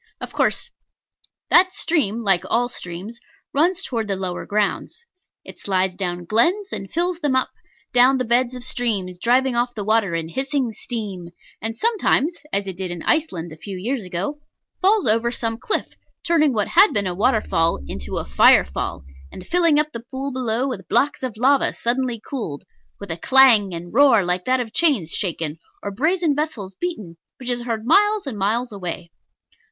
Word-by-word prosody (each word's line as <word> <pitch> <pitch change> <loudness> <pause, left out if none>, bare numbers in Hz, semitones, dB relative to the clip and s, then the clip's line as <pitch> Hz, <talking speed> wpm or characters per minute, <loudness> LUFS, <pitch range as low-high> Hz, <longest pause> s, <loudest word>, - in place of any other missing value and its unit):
Of - - -8
course - - 0 0.8
that 370 +1 +6
stream, 235 - -1
like 195 -4 +2
all 245 +1 +1
streams, 190 +3 -8 0.3
runs 350 +6 +2
towards 230 - -3
the 200 - -1
lower 185 -2 -5
grounds. 210 - -2 0.4
It - - -12
slides 190 -1 0
down 180 -2 -4
glens, 350 - +1
and 195 - -5
fills 350 +1 -1
them 290 -5 0
up; 260 - +1 0.4
down 250 +2 +5
the 255 - -1
beds 240 +2 +1
of 250 - -7
streams, 205 -8 -2
driving 250 +4 +2
off 240 +1 0
the 210 - -4
water 215 -4 +1
in 165 -1 -3
hissing 265 - -2
steam; 200 -6 -6 0.3
and 225 +1 -4
sometimes 375 - +1 0.2
(as 200 0 0
it 190 -2 -6
did 185 -1 -4
in 175 -1 -6
Iceland 180 - 0
a 155 - -10
few 195 +3 -7
years 235 +5 -3
ago) 190 +12 -4 0.4
falls 400 +1 +3
over 230 +1 +3
some 230 -1 -3
cliff, 425 - 0 0.3
turning 315 -4 +3
what 210 -4 -1
had 395 +4 +5
been 200 -1 +1
a 180 - -2
water 220 +5 +2
fall 165 -2 +1
into 65 0 -5
a - - -3
fire - - +5
fall, 65 0 -5 0.3
and 185 - -10
filling 335 - +3
up 300 0 0
the 235 - -6
pool 270 +1 -4
below 250 0 0
with 195 -9 -5
blocks 270 +5 +1
of 250 -5 -4
lava 270 +4 +3
suddenly 245 0 -1
cooled, 215 - -6 0.4
with 200 -4 -7
a 165 - -3
clang 240 -3 +5
and 175 0 -7
roar 245 -6 +5
like 180 0 -1
that 255 0 +2
of 230 -2 -5
chains 270 - +2
shaken 165 -5 -2 0.2
or 200 - -3
brazen 315 - +1
vessels 265 -11 -3
beaten, 210 - -5 0.2
which 250 -2 -4
is 240 0 -1
heard 225 -2 -3
miles 415 - +3
and 240 -7 -5
miles 230 +5 0
away. 180 -3 -6
230 Hz, 185 wpm, -21 LUFS, 190-275 Hz, 0.8 s, that